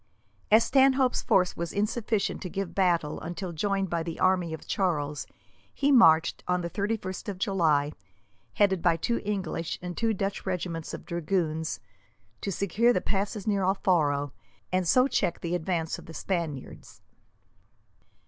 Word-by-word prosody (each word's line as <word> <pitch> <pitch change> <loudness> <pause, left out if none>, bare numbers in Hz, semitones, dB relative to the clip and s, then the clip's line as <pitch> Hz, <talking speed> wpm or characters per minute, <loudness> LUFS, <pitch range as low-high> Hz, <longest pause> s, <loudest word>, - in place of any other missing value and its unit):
As 220 +2 +7
Stanhope's 265 -1 +3
force 180 -1 +2
was 170 -1 -4
insufficient 215 0 -1
to 180 - -5
give 195 0 -4
battle 175 -6 +1
until 175 +2 -5
joined 195 +3 -1
by 170 -1 0
the 165 0 -4
main - - -13
army 185 -3 +2
of 160 - -7
Charles, 150 -6 -1 0.4
he 285 0 +1
marched, 165 - +5
on 180 0 +1
the 170 0 -4
31st 200 -2 -3
of 195 - -4
July, 160 -8 +2 0.6
headed 190 -4 +3
by 165 -1 +3
two 235 +8 -1
English 190 -5 -3
and 180 -1 -6
two 230 -1 +1
Dutch 195 +1 -3
regiments 175 -3 -3
of - - -11
dragoons, 160 -2 -1 0.6
to 200 - -2
secure 200 +6 +2
the - - +2
passes 200 0 -2
near 200 -2 +1
Alfaro, 155 -7 +1 0.4
and 185 -1 +1
so 255 +10 +5
check 195 -9 -1
the 170 0 -3
advance 165 -1 -1
of - - -14
the 165 - -10
Spaniards. 165 -8 -5
185 Hz, 155 wpm, -28 LUFS, 165-200 Hz, 0.6 s, As